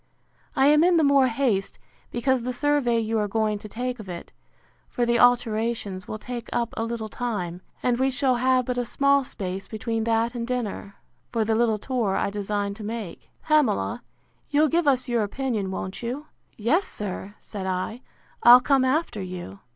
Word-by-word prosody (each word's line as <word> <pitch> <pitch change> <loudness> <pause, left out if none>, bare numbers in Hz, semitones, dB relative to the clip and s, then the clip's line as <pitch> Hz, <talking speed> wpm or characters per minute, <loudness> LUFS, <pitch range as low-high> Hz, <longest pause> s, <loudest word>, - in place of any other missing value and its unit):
I 270 -1 +4
am 300 +2 +6
in 350 0 +4
the 320 - +4
more 280 -2 +5
haste, 230 -5 0 0.3
because 260 +1 +1
the 250 +2 -3
survey 280 -3 +1
you 225 0 0
are 210 - 0
going 215 0 0
to 215 - -10
take 250 +3 -3
of 205 -3 -9
it, 175 -1 -8 0.6
for 240 - 0
the 235 0 +2
alterations, 225 -5 +2
will 215 - -4
take 240 +1 -7
up 235 -1 -1
a 225 - -1
little 230 -1 -3
time; 200 -8 -4 0.2
and 245 -1 +1
we 265 +1 +3
shall 260 -1 +1
have 255 0 +2
but 250 0 -1
a - - +1
small 280 +3 +2
space 195 -5 -5
between 225 0 -2
that 230 +1 +1
and 235 -1 -4
dinner, 230 -5 -3 0.4
for 225 -2 0
the 220 - +1
little 225 -1 +2
tour 225 -4 -1
I - - 0
design 205 0 -2
to 215 +1 -9
make.—Pamela, 230 - -1 0.5
you'll 300 +1 +3
give 330 0 +1
us 260 -2 +3
your 240 -2 +1
opinion, 215 -2 -2
won't 190 0 -5
you? 250 +5 -4 0.3
Yes, 290 - +1
sir, 205 0 -6
said 195 -2 -6
I; 185 +6 -3 0.4
I'll 240 +1 +10
come 270 0 +3
after 260 -5 0
you. 180 - -7
235 Hz, 180 wpm, -25 LUFS, 210-255 Hz, 0.6 s, I'll